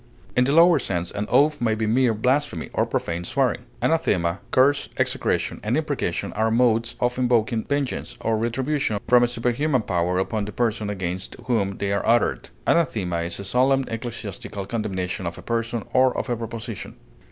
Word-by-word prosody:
In 125 - +4
the 135 - +1
lower 165 +1 +6
sense, 90 -7 -2
an 105 +1 -3
oath 150 0 +3
may 110 -2 +2
be 110 0 -1
mere 115 +1 +3
blasphemy 125 - 0
or - - +1
profane 85 +1 -2
swearing. 125 +3 0 0.2
Anathema, 95 - +1
curse, 140 +3 +3
execration, - - 0
and 110 +6 +1
imprecation 145 - -2
are 110 +1 +1
modes 115 0 +2
of 125 +1 0
invoking 115 -2 +1
vengeance 140 -2 -2
or 115 0 +1
retribution 120 +1 -1
from 125 +1 +6
a 120 - +4
superhuman 125 +2 0
power 90 -1 0
upon 100 +2 -1
the 105 - -6
person 110 -2 -1
against 95 -2 -4
whom 100 -6 0
they 100 0 -1
are 100 - 0
uttered. 120 +1 +1 0.2
Anathema 110 - +1
is 85 +2 -3
a - - -5
solemn 130 +6 +3
ecclesiastical 110 -4 -5
condemnation 95 -5 -3
of 85 - -5
a - - -10
person 115 0 -2
or 130 0 +4
of - - -3
a - - +2
proposition. 115 -1 -6
115 Hz, 175 wpm, -24 LUFS, 100-130 Hz, 0.2 s, lower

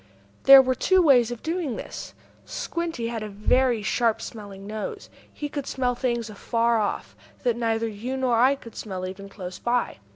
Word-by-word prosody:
There 270 -1 +10
were 255 0 +1
two 375 +8 +3
ways 265 -9 +5
of 240 -2 -7
doing 325 -5 -2
this. - - -8 0.3
Squinty 330 -9 -3
had 230 -2 -4
a 215 - -5
very 230 +3 +2
sharp 225 +1 +1
smelling 200 -3 -9
nose. 215 - -6 0.2
He 295 - -5
could 285 -1 -5
smell 250 -2 0
things 235 -2 -1
afar 230 +2 0
off, 205 - -3 0.3
that 240 -3 +2
neither 230 -1 0
you 230 +5 -4
nor 255 -3 +2
I 260 +3 +5
could 230 -5 -13
smell 185 -3 -5
even 195 +2 -7
close 185 -2 -8
by. 240 0 0
235 Hz, 175 wpm, -25 LUFS, 215-260 Hz, 0.3 s, There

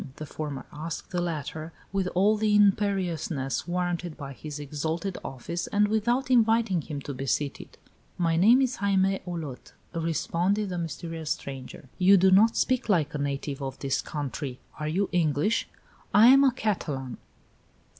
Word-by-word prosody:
the 155 - -7
former 145 -3 -5
asked 155 +2 -6
the 180 -2 -1
latter, 160 -1 -4 0.2
with 195 -2 0
all 200 +4 +4
the 210 -1 +2
imperiousness 185 -10 +1
warranted 175 -2 -2
by 140 -1 -7
his 150 +2 -7
exalted 160 +6 -3
office, 170 +7 -5
and 205 0 +2
without 240 +5 +1
inviting 225 -6 +3
him 150 -1 -6
to 140 +1 -6
be 135 +1 -5
seated. 140 +2 -2 0.4
"My 165 -2 +1
name 230 +10 +6
is 260 -1 -1
Jaime 195 -1 +2
Olot," 160 -7 -6 0.2
responded 175 +5 0
the 180 -1 -3
mysterious 165 -1 -5
stranger. 135 -3 -5
"You 190 +2 +7
do 190 +1 +5
not 215 +4 +5
speak 255 -3 +1
like 160 -6 +2
a 150 - -3
native 140 0 -3
of 135 0 -4
this 135 -1 -1
country. 140 -3 -5 0.2
Are 150 - -2
you 185 +6 0
English?" 165 +4 +1 0.5
"I 220 +4 +8
am 275 +1 +7
a 270 - +5
Catalan." 150 - -3
170 Hz, 155 wpm, -27 LUFS, 145-200 Hz, 0.5 s, I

